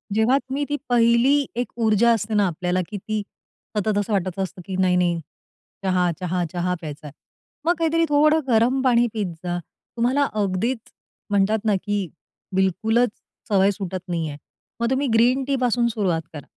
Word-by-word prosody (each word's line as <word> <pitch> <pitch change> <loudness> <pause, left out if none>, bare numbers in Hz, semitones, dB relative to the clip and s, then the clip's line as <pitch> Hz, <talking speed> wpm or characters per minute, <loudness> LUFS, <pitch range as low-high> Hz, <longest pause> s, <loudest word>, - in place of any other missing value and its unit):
जेव्हा 225 +5 +4
तुम्ही 275 +1 -3
ती 290 - 0
पहिली 240 +4 +4
एक 245 +1 -2
ऊर्जा 220 +2 +4
असते 220 0 -2
ना, 205 -2 +3
आपल्याला 180 +1 -1
की 210 - -5
ती 215 +2 -3 0.6
सतत 210 0 +1
असं 205 +1 -1
वाटायचं 190 -1 -1
असतं 185 -1 -7
की, 190 - -4
नाही-नाही, 180 -2 +2 0.6
चहा, 180 -2 +2
चहा, 180 -1 -1
चहा 180 0 0
प्यायचाय, 150 -2 -8 0.5
मग 345 - +4
काहीतरी 330 0 +2
थोडं 305 +2 +4
गरम 245 +2 +3
पाणी 240 -2 +4
पीत 205 -6 -2
जा. 175 -1 -2 0.4
तुम्हाला 255 +5 +2 0.2
अगदीच 200 +6 -1 0.5
म्हणतात 205 +2 +2
ना 210 -2 +3
की 205 -2 -1 0.5
बिलकुलच 220 +6 +2 0.4
सवय 195 -1 +4
सुटत 190 -1 -5
नाहीये, 165 -4 -3 0.4
मग 235 0 +1
तुम्ही 270 +2 +1
ग्रीन 245 +4 +4
टी 280 - +1
पासून 245 -1 +2
सुरुवात 195 -8 0
करा. 145 -3 -8
210 Hz, 160 wpm, -23 LUFS, 185-245 Hz, 0.6 s, जेव्हा